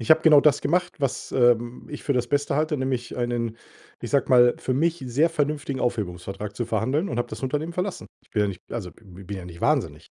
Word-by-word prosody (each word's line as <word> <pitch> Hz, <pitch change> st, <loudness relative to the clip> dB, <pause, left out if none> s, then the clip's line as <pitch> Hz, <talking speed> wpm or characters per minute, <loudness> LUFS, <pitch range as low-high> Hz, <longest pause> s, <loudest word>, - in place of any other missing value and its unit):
Ich 115 Hz, -, -5 dB
habe 160 Hz, -, +8 dB
genau 155 Hz, -3 st, +7 dB
das 145 Hz, -1 st, +4 dB
gemacht, 175 Hz, 0 st, 0 dB
was, 140 Hz, -3 st, -2 dB
ähm, 120 Hz, -1 st, +2 dB
ich 150 Hz, -, -7 dB
für 145 Hz, -, +1 dB
das 125 Hz, -2 st, 0 dB
Beste 145 Hz, 0 st, 0 dB
halte, 155 Hz, 0 st, +1 dB
nämlich 130 Hz, -3 st, -2 dB
einen, 120 Hz, -2 st, -2 dB, 0.4 s
ich -, -, -6 dB
sage 140 Hz, -3 st, +2 dB
mal, 125 Hz, -1 st, +6 dB
für 130 Hz, -, -2 dB
mich 165 Hz, +3 st, +1 dB
sehr 145 Hz, +7 st, +3 dB
vernünftigen 145 Hz, -3 st, -1 dB
Aufhebungsvertrag 100 Hz, -2 st, -3 dB
zu 120 Hz, +2 st, -3 dB
verhandeln 130 Hz, -, 0 dB
und 120 Hz, -, -3 dB
habe 120 Hz, -, -1 dB
das -, -, -8 dB
Unternehmen 150 Hz, +5 st, -2 dB
verlassen. 180 Hz, +2 st, -3 dB, 0.2 s
Ich -, -, -31 dB
bin 105 Hz, -, +1 dB
ja 105 Hz, -, +1 dB
nicht 95 Hz, -3 st, -6 dB
also, 100 Hz, -7 st, -5 dB
b 95 Hz, -3 st, -14 dB
bin 100 Hz, +2 st, -5 dB
ja 90 Hz, -, -8 dB
nicht 85 Hz, -1 st, -11 dB
wahnsinnig. -, -, 0 dB
125 Hz, 230 wpm, -25 LUFS, 115-150 Hz, 0.4 s, habe